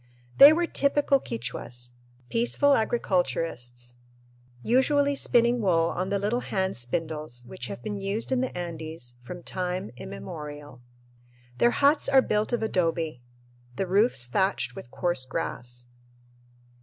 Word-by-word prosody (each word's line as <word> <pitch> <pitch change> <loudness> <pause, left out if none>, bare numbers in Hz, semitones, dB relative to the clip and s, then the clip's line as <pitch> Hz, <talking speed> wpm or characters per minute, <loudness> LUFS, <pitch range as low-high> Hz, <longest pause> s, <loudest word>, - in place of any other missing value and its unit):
They 280 +2 +12
were 345 +2 +2
typical 280 -2 +2
Quichuas 120 - -6 0.3
peaceful 240 +5 +3
agriculturists 165 - -1 0.7
usually 280 +4 +3
spinning 240 -3 +3
wool 170 -4 +2
on 185 +1 -2
the 200 - +1
little 210 +5 0
hand 190 -5 -2
spindles 150 0 -4
which 185 - -6
have 200 - -8
been 205 -2 -4
used 200 +6 -2
in 255 -1 +2
the 260 -7 -3
Andes 160 -7 -7
from 175 +8 -9
time 180 - -3
immemorial. 145 -4 -8 0.8
Their 240 - +5
huts 285 +4 +3
are 265 -1 +6
built 210 +2 0
of 240 -2 0
adobe, 165 - -1 0.5
the 195 - -1
roofs 195 - +2
thatched 130 -3 0
with - - -9
coarse 175 -1 0
grass. 120 -1 -5
180 Hz, 130 wpm, -27 LUFS, -, 0.8 s, They